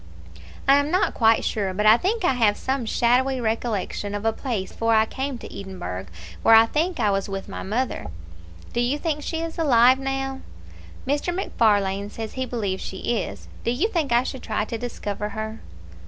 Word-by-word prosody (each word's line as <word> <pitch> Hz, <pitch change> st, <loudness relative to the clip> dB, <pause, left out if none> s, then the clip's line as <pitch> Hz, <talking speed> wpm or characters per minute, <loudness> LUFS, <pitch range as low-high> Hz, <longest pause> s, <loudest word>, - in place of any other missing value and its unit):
"I 275 Hz, +1 st, +7 dB
am 285 Hz, +1 st, +1 dB
not 365 Hz, +4 st, +2 dB
quite 225 Hz, -1 st, +3 dB
sure; 195 Hz, -3 st, -1 dB
but 210 Hz, +2 st, 0 dB
I 215 Hz, +1 st, +9 dB
think 390 Hz, -, 0 dB
I 270 Hz, -, +4 dB
have 220 Hz, -4 st, +3 dB
some 265 Hz, -3 st, -2 dB
shadowy 255 Hz, +4 st, +2 dB
recollection 220 Hz, -3 st, -2 dB
of 205 Hz, +1 st, -4 dB
a 225 Hz, -, +2 dB
place 220 Hz, -9 st, -3 dB
before 230 Hz, 0 st, +1 dB
I 220 Hz, 0 st, +5 dB
came 265 Hz, +3 st, -4 dB
to -, -, -10 dB
Edinburgh, 95 Hz, -, -6 dB, 0.3 s
where 225 Hz, -, +7 dB
I 225 Hz, 0 st, +8 dB
think 320 Hz, +7 st, -1 dB
I 210 Hz, -3 st, +3 dB
was 195 Hz, 0 st, -1 dB
with 195 Hz, 0 st, -5 dB
my -, -, -6 dB
mother." 235 Hz, +6 st, -2 dB, 0.7 s
"Do -, -, -1 dB
you 250 Hz, +4 st, +1 dB
think 300 Hz, -1 st, -2 dB
she 325 Hz, +2 st, -3 dB
is 330 Hz, +1 st, -5 dB
alive 255 Hz, -4 st, +5 dB
now?" 270 Hz, 0 st, -2 dB, 0.7 s
"Mr. 290 Hz, +6 st, 0 dB
MacFarlane 205 Hz, -, +1 dB
says 220 Hz, 0 st, -6 dB
he 260 Hz, 0 st, -3 dB
believes 200 Hz, -6 st, -2 dB
she 215 Hz, +4 st, -2 dB
is. -, -, -6 dB, 0.2 s
Do -, -, 0 dB
you 275 Hz, -, +1 dB
think 325 Hz, -, -1 dB
I 240 Hz, +1 st, +4 dB
should 265 Hz, -1 st, -5 dB
try 215 Hz, -1 st, -1 dB
to 230 Hz, -, -5 dB
discover 210 Hz, -3 st, -4 dB
her?" 220 Hz, +1 st, -5 dB
235 Hz, 195 wpm, -24 LUFS, 210-270 Hz, 0.7 s, I